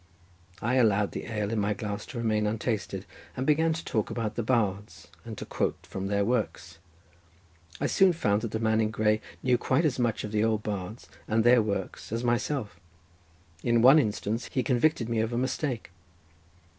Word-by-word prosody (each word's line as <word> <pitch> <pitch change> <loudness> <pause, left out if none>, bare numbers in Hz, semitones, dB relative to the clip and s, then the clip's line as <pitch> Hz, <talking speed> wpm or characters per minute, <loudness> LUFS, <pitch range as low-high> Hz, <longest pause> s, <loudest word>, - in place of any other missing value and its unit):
I 125 +4 +2
allowed 105 -4 +3
the - - -6
ale 105 -1 -2
in 115 - 0
my 105 0 0
glass 105 -1 -5
to 140 - -8
remain 110 -2 +1
untasted, 105 -3 -2 0.3
and 130 - -1
began 160 +2 +3
to 165 - -6
talk 110 -2 -1
about 110 -3 -2
the - - -2
bards, 105 - -1
and 110 -3 -8
to - - -6
quote - - -1
from 95 0 -5
their 100 0 +1
works. 115 -7 -2 1.0
I 145 - -1
soon 190 +5 +4
found 105 -11 +1
that 115 - -3
the 110 - -2
man 110 0 +2
in 110 - +1
grey 110 0 +1 0.2
knew 125 -1 +3
quite 135 +6 +1
as 135 -4 0
much 120 -3 0
of 105 - -5
the 105 0 +1
old 110 -1 +1
bards 105 +1 -5 0.2
and 110 +1 +2
their 120 0 +6
works 100 -3 -4
as 115 +2 -2
myself. 120 -1 -1 0.8
In 120 -1 +2
one 135 +5 +8
instance 110 -1 -2
he 130 - 0
convicted 125 -1 +2
me 115 -1 0
of 110 +2 -1
a - - -1
mistake. 130 - -2
110 Hz, 190 wpm, -28 LUFS, 105-125 Hz, 1.0 s, one